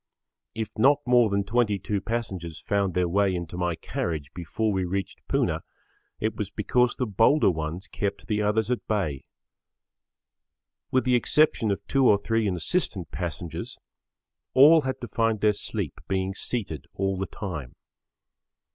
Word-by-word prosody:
If 110 Hz, -1 st, -3 dB
not 140 Hz, +5 st, +6 dB
more 120 Hz, -3 st, +5 dB
than 100 Hz, 0 st, +1 dB
22 105 Hz, -2 st, 0 dB
passengers 95 Hz, -8 st, -4 dB
found 100 Hz, -3 st, 0 dB
their 90 Hz, -1 st, +2 dB
way 95 Hz, +1 st, +2 dB
into 85 Hz, 0 st, -5 dB
my 90 Hz, -1 st, -1 dB
carriage 80 Hz, -3 st, -4 dB
before 90 Hz, +6 st, -2 dB
we 95 Hz, -2 st, 0 dB
reached 95 Hz, 0 st, -3 dB
Poona, -, -, 0 dB, 0.6 s
it 110 Hz, +1 st, -1 dB
was 105 Hz, -5 st, -3 dB
because 120 Hz, +4 st, +1 dB
the 125 Hz, -, -1 dB
bolder 115 Hz, +4 st, +4 dB
ones 80 Hz, +3 st, -4 dB
kept 100 Hz, -1 st, -3 dB
the 105 Hz, -1 st, 0 dB
others 105 Hz, +2 st, +1 dB
at 125 Hz, -, -2 dB
bay. 90 Hz, -11 st, -1 dB, 1.6 s
With 130 Hz, -, +2 dB
the 130 Hz, -, +2 dB
exception 125 Hz, -1 st, +3 dB
of 100 Hz, -, -2 dB
two 135 Hz, -2 st, +3 dB
or 105 Hz, -, +6 dB
three 115 Hz, +1 st, 0 dB
insistent 95 Hz, -, -1 dB
passengers, 85 Hz, -2 st, -5 dB, 0.8 s
all 155 Hz, +5 st, +8 dB
had 130 Hz, -1 st, -3 dB
to 120 Hz, -, -5 dB
find 115 Hz, -2 st, 0 dB
their 105 Hz, 0 st, +3 dB
sleep -, -, -3 dB
being 95 Hz, 0 st, -1 dB
seated 95 Hz, -, -3 dB
all 95 Hz, 0 st, 0 dB
the 95 Hz, 0 st, -3 dB
time. 80 Hz, -, -6 dB
100 Hz, 150 wpm, -26 LUFS, 90-115 Hz, 1.6 s, all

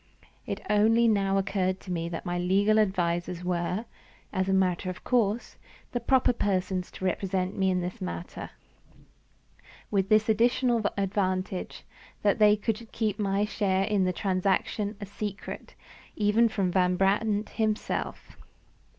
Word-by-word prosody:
It -, -, -3 dB
only 225 Hz, +3 st, +4 dB
now 195 Hz, -3 st, +2 dB
occurred 190 Hz, -1 st, 0 dB
to 185 Hz, -, -8 dB
me 170 Hz, -1 st, -2 dB
that 170 Hz, +2 st, -6 dB
my 175 Hz, -1 st, -2 dB
legal 200 Hz, +4 st, +3 dB
advisers 175 Hz, -3 st, 0 dB
were, 180 Hz, +4 st, -1 dB, 0.5 s
as 190 Hz, -1 st, 0 dB
a -, -, +2 dB
matter 185 Hz, -1 st, +1 dB
of 185 Hz, -, -7 dB
course, 235 Hz, -2 st, 0 dB, 0.3 s
the 245 Hz, -, -1 dB
proper 250 Hz, +1 st, +3 dB
persons 185 Hz, -4 st, -1 dB
to 190 Hz, -, -6 dB
represent 185 Hz, 0 st, -1 dB
me 190 Hz, -1 st, +2 dB
in 180 Hz, -1 st, +1 dB
the 180 Hz, +1 st, -2 dB
matter 85 Hz, -1 st, -6 dB, 1.4 s
with 195 Hz, -1 st, +1 dB
this 215 Hz, 0 st, +4 dB
additional 235 Hz, +2 st, +2 dB, 0.2 s
advantage, 190 Hz, -1 st, -2 dB, 0.4 s
that 205 Hz, 0 st, +2 dB
they 210 Hz, -1 st, +6 dB
could 220 Hz, +2 st, -3 dB
keep 220 Hz, -3 st, -1 dB
my 200 Hz, 0 st, +1 dB
share 195 Hz, -3 st, 0 dB
in 205 Hz, -1 st, +1 dB
the 185 Hz, -, +2 dB
transaction 195 Hz, +2 st, 0 dB
a 205 Hz, -, -5 dB
secret 200 Hz, 0 st, -6 dB, 0.4 s
even 215 Hz, +2 st, +3 dB
from 195 Hz, -4 st, 0 dB
Van 180 Hz, 0 st, +2 dB
Brandt 205 Hz, +3 st, +1 dB
himself. 220 Hz, -1 st, -2 dB
195 Hz, 140 wpm, -28 LUFS, 185-215 Hz, 1.4 s, they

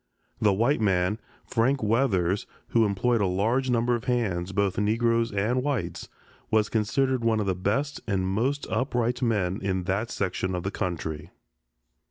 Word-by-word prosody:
The 105 Hz, -, +4 dB
white 115 Hz, +7 st, +2 dB
man, 95 Hz, +1 st, +1 dB, 0.3 s
Frank 125 Hz, +2 st, +1 dB
Weathers, 105 Hz, -5 st, +1 dB, 0.2 s
who 115 Hz, -2 st, +3 dB
employed 110 Hz, +4 st, +1 dB
a 100 Hz, -, +2 dB
large 115 Hz, +8 st, +1 dB
number 120 Hz, 0 st, +2 dB
of 120 Hz, 0 st, -2 dB
hands, 95 Hz, -8 st, 0 dB
both 100 Hz, 0 st, 0 dB
Negroes 115 Hz, +2 st, +1 dB
and 105 Hz, +6 st, 0 dB
whites, 140 Hz, -3 st, -3 dB, 0.4 s
was 110 Hz, -1 st, +2 dB
considered 125 Hz, +3 st, +1 dB
one 115 Hz, -1 st, +2 dB
of 105 Hz, -, 0 dB
the 95 Hz, -, +1 dB
best 110 Hz, +11 st, -1 dB
and 95 Hz, -3 st, 0 dB
most 125 Hz, +9 st, 0 dB
upright 125 Hz, -1 st, 0 dB
men 105 Hz, -6 st, 0 dB
in 95 Hz, -2 st, -1 dB
that 100 Hz, +6 st, -1 dB
section 95 Hz, -2 st, -2 dB
of 90 Hz, -, -3 dB
the 95 Hz, -, -2 dB
country. 80 Hz, -3 st, -4 dB
110 Hz, 160 wpm, -26 LUFS, 95-120 Hz, 0.4 s, The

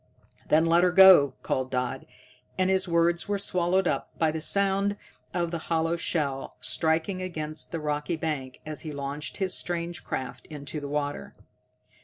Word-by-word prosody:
"Then 160 Hz, +2 st, +4 dB
let 170 Hz, +1 st, +4 dB
'er 180 Hz, -, +5 dB
go," 180 Hz, -8 st, +8 dB
called 130 Hz, 0 st, -1 dB
Dodd, 125 Hz, -1 st, -3 dB, 0.5 s
and 185 Hz, 0 st, +2 dB
his 190 Hz, 0 st, +2 dB
words 170 Hz, 0 st, +2 dB
were 205 Hz, 0 st, 0 dB
swallowed 185 Hz, -1 st, +1 dB
up -, -, -1 dB
by 160 Hz, -1 st, +2 dB
the 160 Hz, 0 st, -4 dB
sound 200 Hz, +3 st, +1 dB, 0.3 s
of 170 Hz, -2 st, -1 dB
the 170 Hz, -, -2 dB
hollow 165 Hz, 0 st, +1 dB
shell 145 Hz, -5 st, -2 dB
striking 165 Hz, +4 st, 0 dB
against 155 Hz, -4 st, -5 dB
the 165 Hz, -, -3 dB
rocky 150 Hz, +2 st, -2 dB
bank 150 Hz, -5 st, -4 dB
as 155 Hz, -1 st, -5 dB
he 155 Hz, -, -6 dB
launched 140 Hz, +1 st, -5 dB
his 190 Hz, -2 st, -1 dB
strange 170 Hz, -1 st, -2 dB
craft 130 Hz, -, -5 dB
into 150 Hz, 0 st, -6 dB
the 145 Hz, -1 st, -6 dB
water. 145 Hz, 0 st, -3 dB
165 Hz, 165 wpm, -27 LUFS, 150-180 Hz, 0.5 s, go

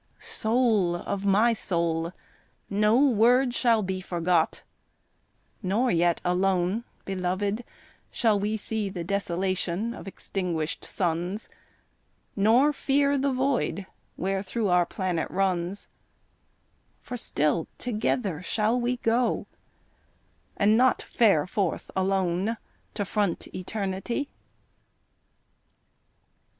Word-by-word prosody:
Soul 220 Hz, -6 st, +1 dB
of 195 Hz, +3 st, -4 dB
my 210 Hz, +4 st, +4 dB
soul, 170 Hz, -5 st, -1 dB, 0.6 s
no 210 Hz, +3 st, +3 dB
word 245 Hz, +2 st, +4 dB
shall 230 Hz, -3 st, +3 dB
be 190 Hz, 0 st, -3 dB
forgot, 175 Hz, -2 st, 0 dB, 1.0 s
Nor 220 Hz, +6 st, +1 dB
yet 170 Hz, 0 st, +2 dB
alone, 185 Hz, +4 st, +1 dB, 0.2 s
beloved, 195 Hz, +4 st, -1 dB, 0.5 s
shall 220 Hz, -3 st, +2 dB
we 210 Hz, +2 st, -1 dB
see 215 Hz, -1 st, -2 dB
The 180 Hz, -3 st, -5 dB
desolation 190 Hz, +2 st, -1 dB
of 235 Hz, -, -10 dB
extinguished 175 Hz, -5 st, -3 dB
suns, 180 Hz, +4 st, -2 dB, 0.9 s
Nor 235 Hz, +9 st, +4 dB
fear 280 Hz, 0 st, +2 dB
the 275 Hz, 0 st, +1 dB
void 255 Hz, -, 0 dB, 0.3 s
wherethro' 195 Hz, +3 st, -1 dB
our 180 Hz, -1 st, +3 dB
planet 180 Hz, -5 st, -2 dB
runs, 185 Hz, 0 st, -1 dB, 1.2 s
For 250 Hz, -, -6 dB
still 155 Hz, -8 st, 0 dB
together 215 Hz, -7 st, -1 dB
shall 220 Hz, +5 st, +1 dB
we 245 Hz, +1 st, 0 dB
go 240 Hz, +1 st, +1 dB, 1.1 s
and 210 Hz, +2 st, +4 dB
not 255 Hz, +2 st, +3 dB
Fare 195 Hz, -11 st, +3 dB
forth 185 Hz, -1 st, -2 dB
alone 190 Hz, +2 st, 0 dB, 0.4 s
to 205 Hz, -, -1 dB
front 200 Hz, -3 st, -1 dB
eternity. 195 Hz, +7 st, -3 dB
200 Hz, 95 wpm, -27 LUFS, 180-230 Hz, 1.2 s, my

